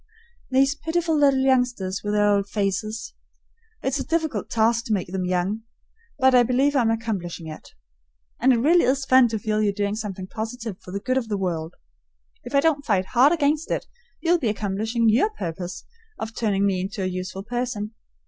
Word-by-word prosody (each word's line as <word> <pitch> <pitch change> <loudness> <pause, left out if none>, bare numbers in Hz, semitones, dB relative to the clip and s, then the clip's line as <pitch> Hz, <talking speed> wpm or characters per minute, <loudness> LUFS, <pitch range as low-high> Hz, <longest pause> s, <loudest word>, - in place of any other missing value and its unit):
These 270 +1 +3
pitiful 325 +2 -1
little 280 -3 +4
youngsters 245 -8 +1
with 205 0 -1
their 205 0 +3
old 200 -1 +2
faces! 215 +2 -2 0.7
It's 265 +1 0
a - - -1
difficult 315 - -1
task 230 +1 +2
to 220 - 0
make 185 -4 -1
them 185 0 -2
young, 185 +4 -1 0.6
but 265 -1 +4
I 250 - +7
believe 260 +4 +2
I'm 240 -4 +3
accomplishing 205 -7 -3
it. 155 -1 -10 0.6
And 260 +2 +4
it 245 - +4
really 325 +9 +4
is 275 +2 +1
fun 260 -2 +6
to 220 -1 -2
feel 215 0 -1
you're 210 -1 +2
doing 200 0 -1
something 200 -4 -5
positive 220 0 -6
for - - -13
the 200 +2 -3
good 255 +4 +1
of 235 - -6
the 210 -2 -1
world. 170 -4 -3 0.7
If 245 +3 -5
I 280 - +5
don't 300 -3 +2
fight 200 -8 +1
hard 260 +4 +6
against 305 -1 +1
it, - - -1 0.4
you'll 345 +1 +3
be 240 - 0
accomplishing 215 +3 -1
your 235 - +4
purpose 180 - -6 0.3
of 220 +1 -5
turning 200 -3 +1
me 190 -2 +1
into 195 +2 -4
a - - 0
useful 185 +1 -4
person. 235 -2 -3
225 Hz, 190 wpm, -24 LUFS, 195-265 Hz, 0.7 s, I